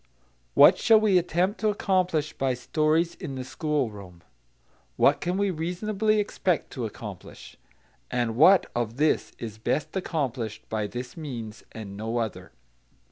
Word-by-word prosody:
What - - +8
shall 225 -1 +6
we 205 -4 +4
attempt 180 +3 0
to 215 +1 +2
accomplish 185 -6 0
by 130 -2 0
stories 155 +6 +1
in 155 -8 -7
the 130 - -4
schoolroom? 110 - -3 0.7
What - - +4
can 180 +2 -1
we 200 -1 +1
reasonably 205 +6 0
expect 185 -4 -1
to 120 -4 -3
accomplish? 105 -4 -10 0.5
And 120 -2 -1
what, 180 +8 +6
of 120 0 -2
this, 150 +1 +1
is 110 -2 -7
best 150 - -2
accomplished 130 - -3
by 110 -1 -1
this 125 +3 -7
means 120 -9 -7
and 105 -3 -8
no 110 +3 -3
other? 95 -6 -4
145 Hz, 140 wpm, -26 LUFS, 115-180 Hz, 0.7 s, What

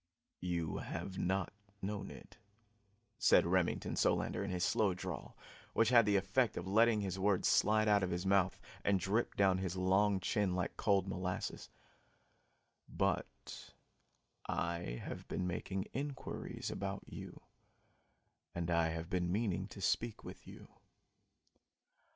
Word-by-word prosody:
"You 85 -3 -2
have 95 -1 -5
not 95 0 0 0.3
known 105 0 -4
it," - - -12 0.8
said - - +5
Remington - - +1
Solander - - +1
in 100 - -3
his 90 -1 -1
slow 100 -1 +2
drawl, 90 - -6 0.4
which 115 0 +3
had 120 -3 +6
the 100 - +3
effect 100 +6 +2
of 85 - -3
letting 110 +2 +4
his 95 -1 -3
words 100 -1 +2
slide 110 +1 +4
out 105 -1 +5
of 95 - 0
his 90 +1 -2
mouth 95 -1 +3 0.2
and 100 -1 +3
drip 105 +6 0
down 95 -2 +3
his 95 -1 -3
long 95 +2 +3
chin 95 0 0
like 90 -1 -2
cold 100 -3 +2
molasses, 90 -1 -3 1.2
"but - - -3 0.7
I 85 -8 -2
have - - -7
been 90 - -2
making 95 +2 -2
inquiries 140 +1 -4
about - - -4
you, - - -9 1.2
and 85 0 -2
I 85 -1 +3
have 80 +1 -4
been 90 -2 0
meaning 100 -2 0
to - - -10
speak 115 -2 0
to - - -7
you. - - -11
95 Hz, 140 wpm, -35 LUFS, 90-105 Hz, 1.2 s, had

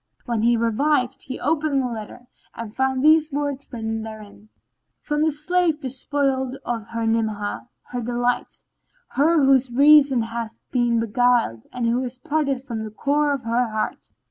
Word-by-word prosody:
When 235 -3 -1
he 235 +1 +3
revived 250 +3 +1
he 260 - -5
opened 300 -1 +1
the 260 - 0
letter 230 +1 -8 0.3
and 230 -2 -7
found 265 0 0
these 310 0 +5
words 285 -1 -3
written 225 -2 -3
therein: 215 -1 -10 0.5
"From 295 0 -2
the 315 0 +3
slave 325 +1 +1
despoiled 265 0 -1
of 230 -3 -3
her 230 0 -3
Ni'amah, 220 0 -1
her 245 - -5
delight; 245 +1 -2 0.5
her 300 +2 +3
whose 265 -1 +4
reason 280 -1 +6
hath 230 0 -5
been 240 -2 +2
beguiled 230 - +1
and 245 -1 -3
who 240 +2 +1
is 250 0 -5
parted 280 -1 -1
from 230 -5 -5
the 215 - -5
core 290 +7 +1
of 275 -3 -2
her 235 +2 +1
heart. 215 0 -3
250 Hz, 160 wpm, -23 LUFS, 230-285 Hz, 0.5 s, reason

